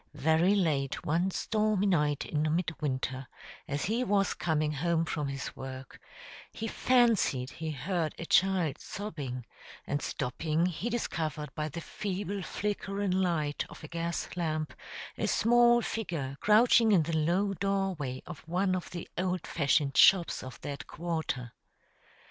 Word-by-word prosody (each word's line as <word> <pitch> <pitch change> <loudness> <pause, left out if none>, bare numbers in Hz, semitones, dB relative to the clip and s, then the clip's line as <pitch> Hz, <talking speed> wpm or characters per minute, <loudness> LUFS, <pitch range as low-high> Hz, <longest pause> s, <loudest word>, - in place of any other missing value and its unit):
Very 160 +6 +3
late 150 -7 0
one 170 +4 +2
stormy 215 0 +1
night 150 -7 +2
in 155 +1 0
midwinter, 135 -6 -2 0.4
as 145 +1 -2
he 230 +5 +1
was 200 -4 +2
coming 155 -2 0
home 165 +2 +1
from 150 -2 -2
his 140 0 -5
work, 130 -1 -8 0.5
he 225 - -4
fancied 225 - +2
he 160 0 -5
heard 155 +3 -2
a 170 - -5
child 180 -3 +3
sobbing, 145 - -5 0.4
and 145 0 -1
stopping, 155 +5 -1
he 185 +6 -2
discovered 160 -10 -3
by 155 0 -2
the 170 +3 -6
feeble 200 +1 -4
flickering 200 0 -2
light 170 -6 0
of - - -12
a - - -6
gas 170 +1 -3
lamp 155 -3 -2 0.5
a - - +1
small 240 0 +5
figure 165 -14 -3
crouching 225 +1 +5
in 180 -6 +5
the 165 +1 -2
low 175 +6 +2
doorway 190 -9 -1
of 175 -5 -8
one 185 +3 +1
of 180 - -4
the 175 -2 -6
old 185 -2 -1
fashioned 140 -2 +1
shops 185 -4 +6
of 130 0 -9
that 140 -1 -6
quarter. 160 -8 -3
170 Hz, 145 wpm, -30 LUFS, 150-195 Hz, 0.5 s, shops